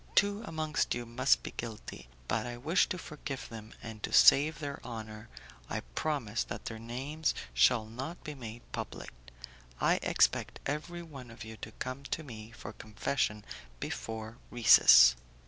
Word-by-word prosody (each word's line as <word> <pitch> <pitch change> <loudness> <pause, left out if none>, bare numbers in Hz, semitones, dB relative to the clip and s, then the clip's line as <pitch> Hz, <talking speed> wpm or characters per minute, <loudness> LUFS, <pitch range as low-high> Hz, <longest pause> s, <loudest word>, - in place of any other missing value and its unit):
Two 205 +1 +3
amongst 155 -4 -1
you 120 0 -4
must 125 +3 +2
be - - -5
guilty; 105 - -7 0.2
but - - 0
I 120 0 -5
wish 155 +9 +2
to 185 - -2
forgive 150 -4 -6
them, 110 -1 -9
and 110 -2 -8
to - - -4
save 150 +2 +7
their 145 -2 -5
honour 110 -2 -7 0.4
I - - -2
promise 120 - -1
that - - -7
their 110 -1 -5
names 135 +7 -2 0.2
shall 110 - +4
not 130 +10 -7
be 150 -3 -5
made 120 -3 -8
public. - - -6 0.7
I - - +3
expect - - +2
every 155 +4 -3
one 135 -7 -10
of 115 - -10
you 110 0 -8
to - - -8
come 130 +1 -5
to 160 - -3
me 110 -6 -9
for 110 -2 -9
confession 105 0 -2 0.3
before 110 +1 -5
recess." 100 - +8
120 Hz, 160 wpm, -32 LUFS, 110-150 Hz, 0.7 s, recess